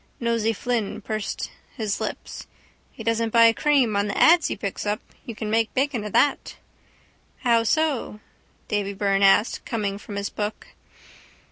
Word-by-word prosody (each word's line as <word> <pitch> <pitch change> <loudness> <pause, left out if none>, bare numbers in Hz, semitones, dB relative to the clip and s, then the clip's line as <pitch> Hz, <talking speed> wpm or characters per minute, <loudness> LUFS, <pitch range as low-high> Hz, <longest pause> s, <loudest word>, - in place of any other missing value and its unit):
Nosey 230 -2 +1
Flynn 225 -1 -2
pursed 215 0 -4 0.3
his 215 -4 -2
lips. - - -6 0.4
—He 225 - -10
doesn't 230 0 0
buy 230 0 +6
cream 270 -6 +2
on 200 +1 +1
the 200 - -3
ads 335 0 +6
he - - -3
picks 200 -2 -4
up. 210 0 -1 0.3
You 230 - -6
can 215 0 -4
make 225 0 +1
bacon 265 -4 0
of 210 - -5
that. 290 - +2 0.9
—How 235 -3 +3
so? 275 -3 0 0.5
Davy 205 -1 -1
Byrne 195 0 +1
asked, 195 +3 +4
coming 205 -3 -3
from 205 -1 -9
his 200 0 -3
book. 210 0 -5
220 Hz, 155 wpm, -24 LUFS, 205-235 Hz, 0.9 s, buy